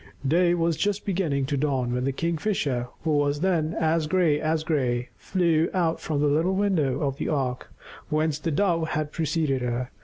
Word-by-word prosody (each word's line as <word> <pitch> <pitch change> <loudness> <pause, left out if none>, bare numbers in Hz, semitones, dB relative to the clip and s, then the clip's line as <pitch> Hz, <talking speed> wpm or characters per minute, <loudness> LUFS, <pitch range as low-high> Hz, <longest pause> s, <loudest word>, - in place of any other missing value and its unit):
Day 175 +4 +3
was 165 -2 0
just 205 +3 -1
beginning 165 -8 0
to 140 +1 -1
dawn 130 -4 0
when 125 +1 -1
the 135 - +1
Kingfisher, 155 - -1 0.2
who 160 - 0
was 145 0 +1
then 170 -4 +1
as 160 -1 +1
gray 160 -3 +2
as 155 0 0
gray, 125 -6 0
flew 170 -4 +1
out 170 -3 +1
from 150 -3 -1
the - - +3
little 160 +6 +2
window 165 -10 +1
of 140 -2 -1
the - - -2
ark 130 -4 -2 0.4
whence 155 -1 0
the 165 - -2
Dove 165 0 +1
had 155 -1 -2
preceded 155 -4 0
her. 125 +1 -2
155 Hz, 185 wpm, -25 LUFS, 140-170 Hz, 0.4 s, Day